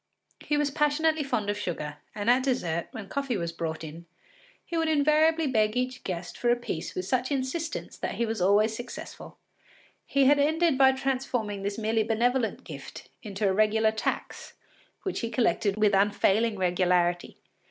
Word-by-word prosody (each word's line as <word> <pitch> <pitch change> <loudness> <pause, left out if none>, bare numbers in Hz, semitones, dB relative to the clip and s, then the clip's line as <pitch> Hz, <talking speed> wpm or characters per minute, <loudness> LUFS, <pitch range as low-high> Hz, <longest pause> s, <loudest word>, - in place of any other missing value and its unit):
He 295 - -1
was 295 -1 +1
passionately 310 +2 +1
fond 225 -7 -1
of 205 0 -1
sugar, 150 -6 -4 0.2
and 205 0 -4
at 250 +2 +5
dessert, 175 -11 -1
when 220 -3 -8
coffee 275 +1 -2
was 170 -2 -3
brought 165 -1 -4
in, 165 +2 -9 0.6
he 340 - -5
would 325 -1 +1
invariably 310 +2 +3
beg 220 -4 +1
each 255 +1 -2
guest 175 -1 -5
for 240 - +1
a 240 - +5
piece 240 -9 -5
with 185 - -3
such 255 +5 0
insistence 280 +5 -3
that - - -4
he 235 - 0
was 220 -3 -3
always 210 +4 +3
successful. 245 - -9 0.7
He 275 -1 +3
had 285 +2 +5
ended 315 +2 +3
by 265 0 +5
transforming 255 -6 -2
this 200 +1 -3
merely 220 0 +1
benevolent 230 +2 0
gift - - -10
into 205 -1 -2
a 190 - +2
regular 215 +2 +3
tax 220 - -4 0.5
which 380 - -2
he 230 - -3
collected 215 -4 +1
with 210 -1 +3
unfailing 205 +2 +2
regularity. 180 -1 +1
225 Hz, 170 wpm, -27 LUFS, 195-270 Hz, 0.7 s, at